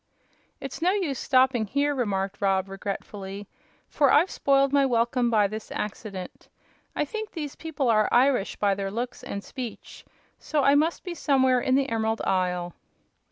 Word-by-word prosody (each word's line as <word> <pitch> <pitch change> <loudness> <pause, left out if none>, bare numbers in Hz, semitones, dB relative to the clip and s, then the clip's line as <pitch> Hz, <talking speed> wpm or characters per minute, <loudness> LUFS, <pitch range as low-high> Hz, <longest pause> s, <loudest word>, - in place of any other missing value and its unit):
"It's 275 +3 -7
no 350 - +3
use 335 -11 -1
stopping 255 -4 +2
here," 285 +6 +1
remarked 200 -7 -2
Rob, 195 -1 +1
regretfully, 195 0 -6 0.4
"for 280 -3 +3
I've 330 +6 +4
spoiled 275 0 +2
my 280 -1 +5
welcome 240 -1 +1
by 215 -3 +3
this 215 +2 -5
accident. 200 -3 -6 0.5
I - - 0
think 435 +7 -5
these 300 -5 -6
people 300 -5 -3
are 215 -2 +3
Irish, 250 -4 +3
by 200 -1 +1
their 195 0 -3
looks 240 +4 -5
and 200 - -5
speech, 250 -5 -8 0.4
so 300 -2 -1
I 280 - +5
must 310 +4 +1
be 360 - -5
somewhere 260 -6 +2
in 260 - +2
the 275 0 +2
Emerald 225 -1 -1
Isle." 180 -2 0
245 Hz, 160 wpm, -26 LUFS, 200-280 Hz, 0.5 s, my